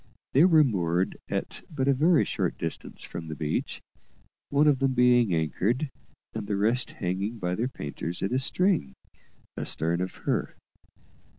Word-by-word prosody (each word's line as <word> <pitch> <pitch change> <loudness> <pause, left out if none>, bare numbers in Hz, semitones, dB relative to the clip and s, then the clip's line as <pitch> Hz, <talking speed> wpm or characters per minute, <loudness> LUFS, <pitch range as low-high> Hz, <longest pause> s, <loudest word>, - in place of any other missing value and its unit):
They 145 +6 +6
were 160 -4 +6
moored 90 - 0
at - - -3
but 140 -4 -2
a 140 - +5
very 155 +4 +4
short - - -2
distance - - -5
from 80 - -7
the 80 - -5
beach, 75 0 -3 0.7
one 145 +2 +3
of 140 -3 +4
them 135 -1 +1
being 125 -3 +4
anchored, 105 - 0 0.4
and 110 -2 -5
the 100 - -1
rest 115 +5 +1
hanging 95 +6 -2
by 90 -4 -2
their 115 +6 0
painters 85 - -5
in 100 - -1
a 130 - +2
string, 135 - +1 0.6
astern 85 +2 0
of 95 - -3
her. - - -1
115 Hz, 160 wpm, -27 LUFS, 90-135 Hz, 0.7 s, They